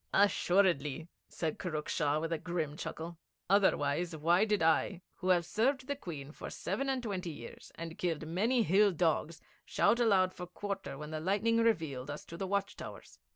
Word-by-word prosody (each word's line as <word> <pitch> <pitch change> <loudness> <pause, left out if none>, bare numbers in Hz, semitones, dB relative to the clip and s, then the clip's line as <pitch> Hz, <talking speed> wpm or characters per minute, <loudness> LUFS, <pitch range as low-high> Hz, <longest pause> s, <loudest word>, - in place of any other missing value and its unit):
'Assuredly,' 175 -6 +3 0.2
said 160 -2 -3
Kurruk 155 -5 -3
Shah 150 -1 +1
with 165 +1 -2
a 160 - -1
grim 160 -3 -2
chuckle. 165 +1 -6 0.3
'Otherwise, 175 -4 +2
why 170 +6 +3
did 210 -5 +1
I, 165 +2 +2
who 185 -1 -2
have 175 -2 +4
served 260 - +1
the 285 +1 -2
Queen 155 - -7
for - - -8
seven 245 +9 -2
and 260 -2 -1
twenty 190 -5 -3
years, 120 -7 -10
and 165 0 -7
killed 165 -3 -1
many 220 +9 +2
hill 200 +2 +4
dogs, 165 0 0 0.2
shout 235 - +2
aloud 195 -6 +4
for 180 -1 -7
quarter 195 -4 -5
when 150 +2 -7
the 155 - -3
lightning 205 +7 +2
revealed 160 - +1
us 145 - -6
to 170 - -9
the 190 +3 -3
watch 200 +1 -1
towers? - - -10
175 Hz, 180 wpm, -33 LUFS, 160-200 Hz, 0.3 s, have